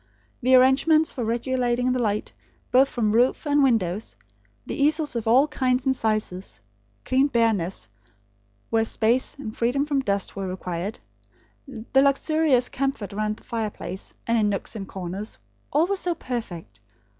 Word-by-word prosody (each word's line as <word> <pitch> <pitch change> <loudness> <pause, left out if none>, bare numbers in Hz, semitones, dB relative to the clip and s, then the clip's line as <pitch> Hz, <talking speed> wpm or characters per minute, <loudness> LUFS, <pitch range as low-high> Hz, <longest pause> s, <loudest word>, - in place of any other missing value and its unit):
The 255 +2 +5
arrangements 280 +5 +4
for 250 - -4
regulating 245 +2 0
the 250 0 0
light, 210 -2 -1 0.4
both 265 +2 +5
from 215 -3 0
roof 245 +7 +2
and 290 0 +3
windows; 215 - +1 0.5
the - - -5
easels 300 -1 +1
of 230 -2 -3
all 260 +6 +5
kinds 255 -3 0
and 265 -1 +2
sizes; 210 - -2 0.5
clean 265 +2 +3
bareness, 210 - 0 0.8
where 225 0 +3
space, 225 +3 0
and 225 -6 -7
freedom 250 +5 +1
from 290 -2 0
dust, 200 -7 -1
were 195 -1 -3
required; 185 +1 -4 0.7
the 240 +4 0
luxurious 280 -2 +2
comfort 270 -8 -3
round 215 +1 -2
the - - -19
fireplace, 215 -4 -5
and 230 0 +2
in 210 -1 +2
nooks 200 +3 -3
and 195 -3 -6
corners; 190 +3 -6 0.3
all 305 +4 +3
were 395 +2 -1
so 355 -2 -1
perfect. 175 - -6
235 Hz, 150 wpm, -24 LUFS, 210-270 Hz, 0.8 s, The